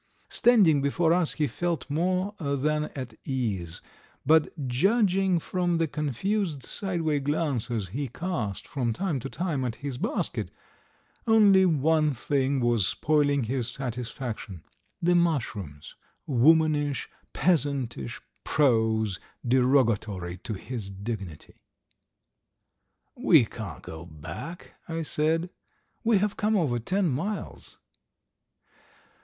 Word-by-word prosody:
Standing 195 Hz, -, +5 dB
before 160 Hz, +4 st, +2 dB
us 175 Hz, -2 st, +1 dB
he 150 Hz, -, 0 dB
felt 170 Hz, +6 st, -2 dB
more 185 Hz, +6 st, 0 dB
than 150 Hz, 0 st, 0 dB
at 130 Hz, -4 st, -6 dB
ease, 100 Hz, -11 st, -3 dB, 0.4 s
but 155 Hz, -1 st, +2 dB
judging 190 Hz, -, +2 dB
from 175 Hz, +1 st, 0 dB
the 165 Hz, -1 st, +1 dB
confused 150 Hz, -, -2 dB
sideway 165 Hz, -, -1 dB
glances 130 Hz, -, -1 dB
he 135 Hz, +8 st, -3 dB
cast 120 Hz, -, -4 dB
from 120 Hz, -5 st, -1 dB
time 175 Hz, -, -1 dB
to 135 Hz, -, -6 dB
time 165 Hz, -6 st, -2 dB
at 120 Hz, -3 st, -2 dB
his 140 Hz, -2 st, -5 dB
basket, -, -, -2 dB, 0.8 s
only 200 Hz, -4 st, +6 dB
one 155 Hz, -1 st, +2 dB
thing 135 Hz, +2 st, 0 dB
was 120 Hz, -5 st, +2 dB
spoiling 145 Hz, +2 st, +2 dB
his 120 Hz, +1 st, -2 dB
satisfaction 120 Hz, -, -5 dB, 0.4 s
the 175 Hz, +1 st, +4 dB
mushrooms, 115 Hz, -, -1 dB, 0.3 s
womanish, 145 Hz, +1 st, +3 dB, 0.2 s
peasantish, 140 Hz, -, 0 dB, 0.2 s
prose, 110 Hz, -, +2 dB, 0.3 s
derogatory 115 Hz, -8 st, +2 dB
to 110 Hz, +5 st, -5 dB
his 110 Hz, 0 st, -5 dB
dignity. 100 Hz, -4 st, -7 dB, 1.5 s
"We -, -, +5 dB
can't -, -, -8 dB
go 80 Hz, +2 st, -8 dB
back!" 90 Hz, -, -8 dB, 0.2 s
I 165 Hz, 0 st, -2 dB
said. 160 Hz, +3 st, 0 dB, 0.5 s
"We 225 Hz, -2 st, +4 dB
have 205 Hz, +1 st, 0 dB
come 215 Hz, +1 st, +1 dB
over 135 Hz, -10 st, +1 dB
ten 185 Hz, -, 0 dB
miles!" 170 Hz, +10 st, -4 dB
145 Hz, 110 wpm, -27 LUFS, 120-170 Hz, 1.5 s, only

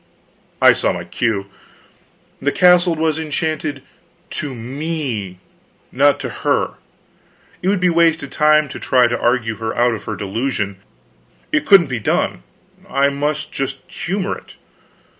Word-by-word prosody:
I -, -, +9 dB
saw -, -, 0 dB
my 85 Hz, -, -4 dB
cue. 100 Hz, +3 st, -1 dB, 1.0 s
The 145 Hz, +1 st, +1 dB
castle 180 Hz, -1 st, +5 dB
was 160 Hz, 0 st, 0 dB
enchanted 155 Hz, -2 st, -3 dB, 0.5 s
to 145 Hz, -4 st, -4 dB
me, 125 Hz, -, -4 dB, 0.5 s
not -, -, +3 dB
to -, -, -4 dB
her. -, -, +1 dB, 0.8 s
It 180 Hz, -, -2 dB
would 200 Hz, -1 st, +2 dB
be 180 Hz, -1 st, +3 dB
wasted 165 Hz, -3 st, +2 dB
time 155 Hz, 0 st, +4 dB
to 140 Hz, -, -7 dB
try 125 Hz, -1 st, +3 dB
to 120 Hz, 0 st, 0 dB
argue 120 Hz, -3 st, +1 dB
her 110 Hz, +1 st, -3 dB
out 120 Hz, 0 st, +3 dB
of 110 Hz, -, -7 dB
her 110 Hz, -, -3 dB
delusion, 100 Hz, -1 st, -2 dB, 0.7 s
it 305 Hz, -1 st, 0 dB
couldn't 195 Hz, -4 st, +7 dB
be 125 Hz, -4 st, -3 dB
done; 105 Hz, -, 0 dB, 0.5 s
I 140 Hz, +1 st, +2 dB
must 150 Hz, +2 st, -2 dB
just 135 Hz, 0 st, -4 dB
humor 190 Hz, +1 st, -2 dB
it. -, -, -14 dB
140 Hz, 140 wpm, -19 LUFS, 120-160 Hz, 1.0 s, I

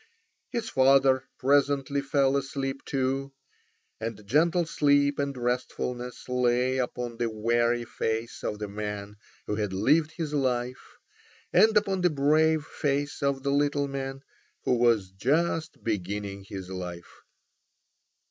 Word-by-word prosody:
His 235 Hz, -3 st, -3 dB
father 135 Hz, -3 st, +4 dB
presently 140 Hz, +1 st, +2 dB
fell 140 Hz, -1 st, +2 dB
asleep 135 Hz, 0 st, -2 dB
also. 135 Hz, 0 st, -1 dB, 0.7 s
And 110 Hz, -2 st, -5 dB
gentle 165 Hz, -, +3 dB
sleep 145 Hz, -2 st, +2 dB
and 140 Hz, -1 st, -1 dB
restfulness 125 Hz, 0 st, -3 dB
lay 125 Hz, +1 st, +1 dB
upon 120 Hz, -1 st, -3 dB
the 120 Hz, -1 st, 0 dB
weary 120 Hz, +2 st, +1 dB
face 115 Hz, 0 st, -3 dB
of 105 Hz, -, -2 dB
the 105 Hz, 0 st, -4 dB
man 105 Hz, 0 st, -5 dB, 0.3 s
who 105 Hz, -, -2 dB
had 105 Hz, -3 st, -2 dB
lived 150 Hz, +10 st, +2 dB
his 160 Hz, -4 st, -4 dB
life, 125 Hz, -3 st, -2 dB, 0.6 s
and 220 Hz, 0 st, +6 dB
upon 195 Hz, -3 st, +1 dB
the 180 Hz, -, +4 dB
brave 155 Hz, +1 st, +3 dB
face 145 Hz, 0 st, -2 dB
of 140 Hz, -1 st, 0 dB
the 140 Hz, -, 0 dB
little 145 Hz, 0 st, +1 dB
man 135 Hz, 0 st, -5 dB, 0.4 s
who -, -, +2 dB
was 115 Hz, -6 st, +2 dB
just 155 Hz, -, 0 dB
beginning 100 Hz, -1 st, -3 dB
his 95 Hz, -1 st, -7 dB
life. 90 Hz, -2 st, -7 dB
130 Hz, 130 wpm, -27 LUFS, 115-145 Hz, 0.7 s, and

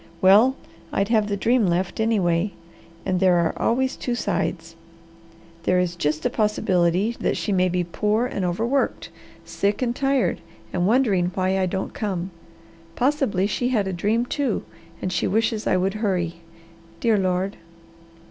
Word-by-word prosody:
Well 210 Hz, +9 st, +6 dB, 0.4 s
I'd 195 Hz, +1 st, 0 dB
have 215 Hz, -3 st, +3 dB
the 200 Hz, -1 st, -1 dB
dream 230 Hz, +1 st, +2 dB
left 175 Hz, +4 st, -1 dB
anyway. 195 Hz, -4 st, +1 dB, 0.5 s
And 185 Hz, -2 st, 0 dB
there 185 Hz, -1 st, +4 dB
are 170 Hz, -2 st, +2 dB
always 260 Hz, +3 st, +1 dB
two 245 Hz, -, -3 dB
sides. 165 Hz, -7 st, -2 dB, 0.9 s
There 180 Hz, +2 st, +2 dB
is 175 Hz, -1 st, -1 dB
just 155 Hz, -2 st, -1 dB
a -, -, +3 dB
possibility 195 Hz, 0 st, +1 dB
that -, -, 0 dB
she 210 Hz, -, -2 dB
may 185 Hz, -1 st, +2 dB
be 180 Hz, 0 st, 0 dB
poor 210 Hz, +6 st, 0 dB
and 205 Hz, -6 st, -3 dB
overworked, 230 Hz, +10 st, -1 dB, 0.4 s
sick 205 Hz, +5 st, -1 dB
and 240 Hz, -1 st, -1 dB
tired, 275 Hz, -1 st, +1 dB, 0.3 s
and 180 Hz, 0 st, +1 dB
wondering 210 Hz, -7 st, +2 dB
why 190 Hz, 0 st, +1 dB
I 185 Hz, -, +1 dB
don't 190 Hz, +1 st, -3 dB
come. 190 Hz, -3 st, -3 dB, 0.6 s
Possibly 255 Hz, -8 st, +1 dB
she 245 Hz, +4 st, -1 dB
had 215 Hz, -6 st, +1 dB
a 190 Hz, -, -2 dB
dream, 215 Hz, +7 st, 0 dB
too, 265 Hz, -3 st, -1 dB, 0.4 s
and 185 Hz, -, -1 dB
she -, -, 0 dB
wishes 220 Hz, +1 st, 0 dB
I -, -, +3 dB
would 190 Hz, +1 st, 0 dB
hurry. 185 Hz, -6 st, -1 dB, 0.6 s
Dear 220 Hz, 0 st, +2 dB
Lord!" 185 Hz, +1 st, -1 dB
195 Hz, 155 wpm, -23 LUFS, 180-225 Hz, 0.9 s, Well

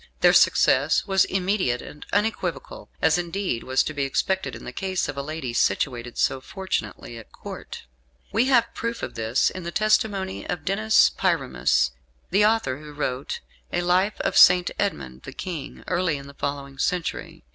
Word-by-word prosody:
Their -, -, +6 dB
success -, -, +4 dB
was 195 Hz, -2 st, +3 dB
immediate 185 Hz, -9 st, 0 dB
and 150 Hz, -, -11 dB
unequivocal, 200 Hz, -7 st, -2 dB
as 160 Hz, +2 st, +4 dB
indeed 175 Hz, -7 st, -2 dB
was 130 Hz, 0 st, +2 dB
to 155 Hz, -, -4 dB
be 145 Hz, -2 st, -1 dB
expected 190 Hz, +7 st, -1 dB
in -, -, -10 dB
the -, -, -6 dB
case 190 Hz, -2 st, -2 dB
of 145 Hz, -, -4 dB
a 140 Hz, -, -3 dB
lady 150 Hz, -4 st, -5 dB
situated 120 Hz, +2 st, 0 dB
so 135 Hz, -, +1 dB
fortunately 190 Hz, -, -4 dB
at 115 Hz, -, -15 dB
Court. -, -, -9 dB, 0.5 s
We 225 Hz, +5 st, +3 dB
have 240 Hz, -3 st, +3 dB
proof 230 Hz, 0 st, -4 dB
of -, -, -4 dB
this 115 Hz, +3 st, +1 dB
in 185 Hz, -, -7 dB
the 170 Hz, -, -5 dB
testimony 205 Hz, -1 st, +1 dB
of 170 Hz, -4 st, -3 dB
Denis 215 Hz, +4 st, +4 dB
Pyramus, -, -, +1 dB, 0.4 s
the 200 Hz, +3 st, +4 dB
author 210 Hz, -12 st, +2 dB
who 150 Hz, -1 st, -11 dB
wrote 135 Hz, -2 st, -3 dB, 0.3 s
a 175 Hz, -, 0 dB
Life 185 Hz, +4 st, +1 dB
of -, -, -1 dB
St. 180 Hz, 0 st, +7 dB
Edmund 65 Hz, -, -2 dB
the -, -, -9 dB
King, 165 Hz, -7 st, -6 dB
early 175 Hz, -4 st, 0 dB
in 140 Hz, -, -9 dB
the 140 Hz, -, -11 dB
following 140 Hz, -1 st, -5 dB
century. 180 Hz, -3 st, -2 dB
170 Hz, 170 wpm, -24 LUFS, 135-195 Hz, 0.5 s, St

